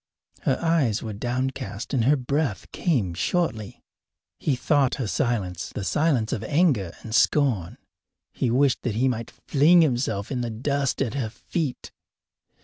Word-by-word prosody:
Her 130 - +1
eyes 160 -10 +1
were 110 -2 -4
downcast 120 -1 -3
and 120 -4 +2
her 145 +4 +5
breath 135 -4 -1
came 120 - 0
shortly. 110 - -2 0.6
He 140 - +1
thought 135 +1 +2
her 130 - -3
silence 105 - -1
the 100 - -5
silence 120 - +1
of 110 - -3
anger 130 - +1
and 110 - -7
scorn. 125 - +2 0.5
He 125 - -1
wished 130 +2 +2
that 115 -4 -2
he 125 +4 +2
might 115 -3 -2
fling 165 +4 +4
himself 120 -7 -1
in 125 -3 -1
the 120 - -2
dust 135 +4 -1
at 120 - -4
her 130 -6 -2
feet. 145 - -4
125 Hz, 150 wpm, -25 LUFS, 110-145 Hz, 0.6 s, her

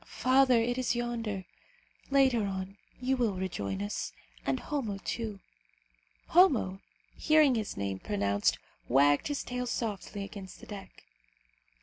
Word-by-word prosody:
Father, 255 -1 +4
it 245 +2 0
is 250 -1 +1
yonder. 230 -5 -2 0.6
Later 260 -6 +4
on, 190 0 -4 0.2
you 255 +2 +1
will 235 -6 +1
rejoin 100 - -3
us, 100 - -3 0.3
and 135 -1 +1
Homo, 235 -9 -3
too." 215 0 -4 0.9
Homo, 250 - +4 0.4
hearing 305 -3 +5
his 220 -3 -2
name 100 -1 -2
pronounced, 100 0 +1 0.3
wagged 145 +3 +4
his 290 -1 -2
tail 250 0 -3
softly 210 -3 -3
against 195 -2 -9
the - - -12
deck. 200 -2 -10
215 Hz, 125 wpm, -30 LUFS, 185-250 Hz, 0.9 s, hearing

